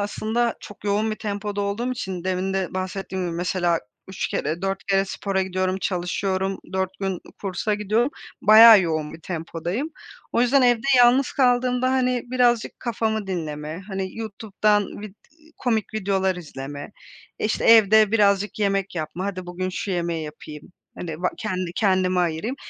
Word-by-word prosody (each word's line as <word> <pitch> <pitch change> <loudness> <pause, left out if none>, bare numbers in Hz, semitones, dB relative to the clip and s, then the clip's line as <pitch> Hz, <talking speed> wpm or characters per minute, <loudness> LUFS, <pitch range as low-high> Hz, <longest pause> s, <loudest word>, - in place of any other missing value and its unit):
aslında 220 +3 -1
çok 205 - -12
yoğun 210 +2 +1
bir 215 - -3
tempoda 205 -1 -4
olduğum 210 +5 -1
için, 185 -7 -5
demin 185 +1 -1
de 190 -1 -2
bahsettiğim 185 0 -3
gibi 170 - -4
mesela 175 -1 0 0.3
3 190 - -3
kere, 160 +5 -2
4 195 0 -2
kere 195 -1 +2
spora 195 0 -2
gidiyorum, 185 0 -1
çalışıyorum. 190 +1 -1
4 190 -1 0
gün, 195 - -1
ııı, 180 - -5 0.2
kursa 200 +2 -1
gidiyorum, 215 +6 +1 0.3
bayağı 220 0 +9
yoğun 155 -4 -2
bir 165 - -11
tempodayım. 170 - -4 0.4
O - - +2
yüzden 255 +2 +4
evde 245 -2 +3
yalnız 245 +2 +5
kaldığımda, 250 -1 +2
hani, 250 -2 +1
birazcık 245 -2 +1
kafamı 220 -3 -1
dinleme, 155 -3 -4
hani, 190 -1 -4
YouTube'dan 210 -1 0 0.2
vid 210 -2 -9 0.2
eee, 315 +1 -24
komik 225 -3 -1
videolar 190 -3 0
izleme, 145 0 -8 0.5
işte, 215 - -1
evde 220 -1 +6
birazcık 205 -1 +2
yemek 195 -2 0
yapma, 170 +3 -4
hadi, 185 -2 -5
bugün 180 +1 -3
şu 195 +2 -4
yemeği 170 -3 -2
yapayım, 150 +2 -10 0.3
hani, 165 0 -6
ba 180 - +3
kendi 185 -5 -3
kendime 185 -2 +2
ayırayım, 175 +9 -1
195 Hz, 155 wpm, -23 LUFS, 180-220 Hz, 0.5 s, bayağı